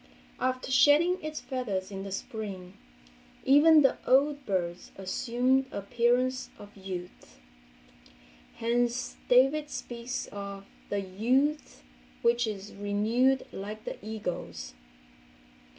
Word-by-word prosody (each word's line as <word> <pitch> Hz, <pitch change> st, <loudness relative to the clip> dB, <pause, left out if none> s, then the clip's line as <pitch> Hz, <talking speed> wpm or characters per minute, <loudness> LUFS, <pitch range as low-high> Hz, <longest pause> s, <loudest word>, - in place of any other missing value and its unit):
After 255 Hz, 0 st, -1 dB
shedding 305 Hz, +7 st, +5 dB
its 310 Hz, 0 st, -5 dB
feathers 205 Hz, -8 st, -3 dB
in 195 Hz, -1 st, -5 dB
the 195 Hz, 0 st, -6 dB
spring, 195 Hz, -3 st, -6 dB, 0.7 s
even 300 Hz, +3 st, +7 dB
the 270 Hz, -, +3 dB
old 280 Hz, +1 st, +3 dB
birds 175 Hz, -2 st, -2 dB
assume 245 Hz, +7 st, +1 dB
the 265 Hz, -, -9 dB
appearance 245 Hz, +4 st, +1 dB
of 205 Hz, 0 st, -13 dB
youth, 185 Hz, -, -8 dB, 1.2 s
hence 240 Hz, +1 st, 0 dB
David 270 Hz, +4 st, +4 dB
speaks 240 Hz, 0 st, -5 dB
of 200 Hz, -1 st, -7 dB, 0.2 s
the 205 Hz, 0 st, -1 dB
"youth 245 Hz, -, 0 dB, 0.4 s
which 235 Hz, 0 st, +3 dB
is 205 Hz, -1 st, -6 dB
renewed 220 Hz, +6 st, +1 dB
like 210 Hz, +2 st, -7 dB
the -, -, -7 dB
eagle's." 175 Hz, -, -5 dB
235 Hz, 105 wpm, -29 LUFS, 200-260 Hz, 1.2 s, even